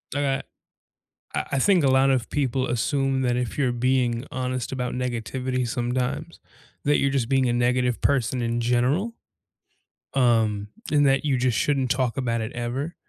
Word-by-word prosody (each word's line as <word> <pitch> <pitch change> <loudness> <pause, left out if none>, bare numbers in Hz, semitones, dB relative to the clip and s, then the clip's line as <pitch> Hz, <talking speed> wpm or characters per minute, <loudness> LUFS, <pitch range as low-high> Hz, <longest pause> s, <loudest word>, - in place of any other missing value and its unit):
I 145 - +1
got 135 -1 -1 0.9
I - - -1
I 140 - +2
think 185 +2 +4
a 135 - +4
lot 135 +1 +4
of 130 -3 +1
people 130 -2 0
assume 135 +2 0
that 125 -1 +1
if 125 -2 -3
you're 135 -4 +2
being 120 0 0
honest 130 -1 -3
about 125 -2 -3
negativity 125 +1 -2
sometimes, 125 +2 -2 0.5
that 145 +1 +4
you're 140 - +2
just 130 -4 0
being 135 -1 +3
a - - +1
negative 125 0 +1
person 130 -2 +1
in 120 0 -1
general, 125 - +1 1.0
um, 110 -5 +2 0.2
and 145 -1 +4
that 135 +2 +2
you 140 -3 +2
just 125 -3 +1
shouldn't 135 +2 +1
talk 130 0 0
about 115 -3 -1
it 110 - -4
ever, 130 +7 -3
125 Hz, 170 wpm, -24 LUFS, 120-135 Hz, 1.0 s, think